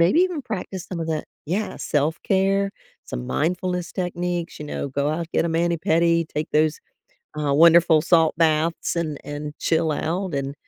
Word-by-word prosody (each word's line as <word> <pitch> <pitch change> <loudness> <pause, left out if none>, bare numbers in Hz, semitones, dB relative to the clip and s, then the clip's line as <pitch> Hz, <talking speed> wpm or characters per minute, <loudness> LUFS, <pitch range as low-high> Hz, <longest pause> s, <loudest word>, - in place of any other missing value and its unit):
maybe 180 - +5
even 350 -6 -1
practice 190 -5 -5
some 180 - -5
of 165 - -3
that 155 -1 -1 0.2
yeah, 200 +6 -2
self-care, 190 +6 +1 0.3
some 60 0 -6
mindfulness 180 +2 -1
techniques, 175 -1 -3
you 150 - -7
know, 140 - -4
go 140 +2 -1
out, 165 +1 -3
get - - +2
a - - 0
mani 170 +1 +1
pedi, 165 0 +2
take 150 +1 -3
those, 155 0 +2 0.6
uh, 145 -2 0
wonderful 165 0 +6
salt 165 -1 +3
baths, 160 +1 +1
and 155 -4 -2
and 145 0 -6
chill 160 -1 +1
out, 175 +4 -2
and, 140 0 -2
165 Hz, 170 wpm, -23 LUFS, 155-180 Hz, 0.6 s, wonderful